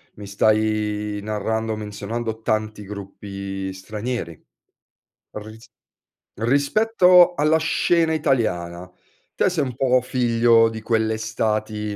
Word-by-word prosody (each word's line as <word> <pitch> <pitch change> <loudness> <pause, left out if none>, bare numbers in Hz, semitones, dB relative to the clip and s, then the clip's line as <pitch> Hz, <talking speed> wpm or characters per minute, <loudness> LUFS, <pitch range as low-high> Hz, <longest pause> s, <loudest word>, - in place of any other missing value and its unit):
mi 100 -1 -10
stai 105 0 0
narrando 110 +1 -2
menzionando 110 +2 -5
tanti 110 -1 -2
gruppi 100 -1 -7
stranieri. 105 -2 -5 0.9
Ris 110 +1 -10 0.7
rispetto 180 - +4
alla 155 +1 +3
scena 165 0 +1
italiana, 90 - -1 0.5
te - - +2
sei 170 -5 -1
un 125 -2 -6
po' 130 0 +2
figlio 115 -2 +3
di 110 0 -7
quelle 110 0 0
estati 110 -1 -2
110 Hz, 100 wpm, -22 LUFS, 105-125 Hz, 0.9 s, rispetto